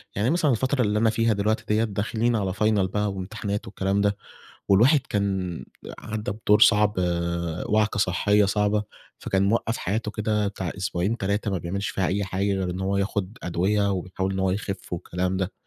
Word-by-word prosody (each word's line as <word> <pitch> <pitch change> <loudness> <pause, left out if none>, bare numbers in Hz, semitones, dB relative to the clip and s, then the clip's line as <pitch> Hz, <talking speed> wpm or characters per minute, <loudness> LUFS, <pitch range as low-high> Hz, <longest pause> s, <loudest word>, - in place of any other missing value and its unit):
يعني 105 +5 +1
مثلًا 160 -2 +2
الفترة 130 +3 +1
اللي 105 -2 +1
أنا 115 0 +4
فيها 115 0 +2
دلوقتي 105 +2 0
ديَّة 105 +1 +2
داخلين 110 +3 0
على 95 -4 -1
Final 100 - -2 0.3
بقى 105 0 0
وامتحانات 100 +2 -4
والكلام 95 0 0
ده 100 0 +1 0.5
والواحد 120 +10 +5
كان 95 -4 -2 0.3
عدى 110 -1 -4
بدور 105 0 +2
صعب، 105 -1 +5 0.7
وعكة 105 0 +1
صحية 100 +2 +3
صعبة، 105 +1 +1 0.4
فكان 95 0 0
موقّف 115 +2 +1
حياته 105 +3 -2
كده 105 -1 0
بتاع 95 -3 -4
أسبوعين، 95 +3 -1
3، 100 0 -1
ما 95 - -1
بيعملش 95 +4 -3
فيها 95 - -1
أي 100 +1 0
حاجة 95 +2 -1
غير 95 -2 -1
إن 90 +1 -4
هو 95 +1 0
ياخد 100 +2 -2
أدوية، 100 +4 +1
ويحاول 95 +1 -3
إن 95 - -3
هو 95 0 +1
يخف 95 -1 -4
والكلام 90 +2 -2
ده، 95 +1 -2
100 Hz, 175 wpm, -25 LUFS, 95-105 Hz, 0.7 s, والواحد